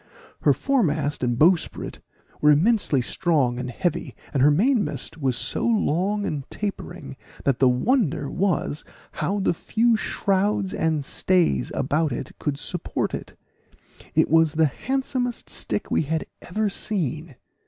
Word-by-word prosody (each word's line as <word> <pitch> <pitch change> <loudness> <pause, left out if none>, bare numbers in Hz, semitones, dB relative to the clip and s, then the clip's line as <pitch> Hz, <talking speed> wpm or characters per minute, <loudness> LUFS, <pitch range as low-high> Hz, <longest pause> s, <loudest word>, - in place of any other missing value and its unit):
Her - - +5
foremast 155 - 0
and 120 -1 +1
bowsprit 165 +4 +2 0.4
were 150 - +5
immensely 155 - +3
strong 140 -7 +1
and 125 0 -4
heavy, 170 +6 -2 0.2
and 135 - +1
her 145 - +7
mainmast 205 - +1
was 130 -4 0
so - - -2
long 205 -2 +1
and 145 -3 -2
tapering, 175 -8 -6 0.3
that 135 -3 +2
the 130 - +5
wonder 160 - +1
was 175 -3 -1 0.3
how 205 +2 -1
the 195 - +2
few 230 +7 +2
shrouds 200 -2 0
and 160 -3 0
stays 165 - +1
about 150 +3 +1
it 130 +2 -4
could 145 -2 -2
support 170 +4 -2
it; - - -7 0.8
it - - +4
was 160 -1 +4
the 160 0 +4
handsomest 250 - -2
stick - - -3
we - - +3
had 160 +1 -2 0.2
ever 215 +4 -1
seen. 165 - -3
165 Hz, 140 wpm, -24 LUFS, 145-205 Hz, 0.8 s, her